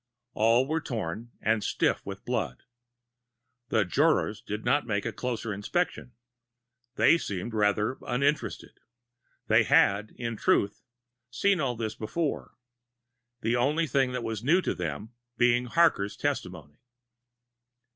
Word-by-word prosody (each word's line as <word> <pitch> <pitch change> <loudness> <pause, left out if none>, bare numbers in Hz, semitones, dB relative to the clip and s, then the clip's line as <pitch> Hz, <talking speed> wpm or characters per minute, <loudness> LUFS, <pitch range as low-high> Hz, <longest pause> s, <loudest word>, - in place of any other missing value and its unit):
All 115 +4 +3
were 160 +2 -1
torn, 115 - -4
and 110 -1 +1
stiff - - 0
with - - -7
blood. 60 - -2 1.1
The 110 -3 +2
jurors 140 - +1
did 105 +1 -5
not 145 -3 +2
make 100 -3 -1
a - - -2
closer 115 -3 -3
inspection. 125 - -2 0.8
They 170 - +5
seemed 105 - -4
rather 105 +3 +1
uninterested. 140 +5 -1 0.7
They - - +5
had, 100 +2 +3
in 115 -2 -4
truth, 100 0 +1 0.5
seen 190 +10 +1
all 125 -4 0
this 110 -1 -3
before; 140 +8 -3 0.9
the 115 +2 +1
only 145 +7 +2
thing 135 -2 +1
that 125 -2 -3
was 110 -1 -4
new 165 +8 +4
to - - 0
them 90 +7 -5 0.2
being 120 0 +3
Harker's 125 -7 +2
testimony. 90 - -4
115 Hz, 125 wpm, -28 LUFS, 105-135 Hz, 1.1 s, They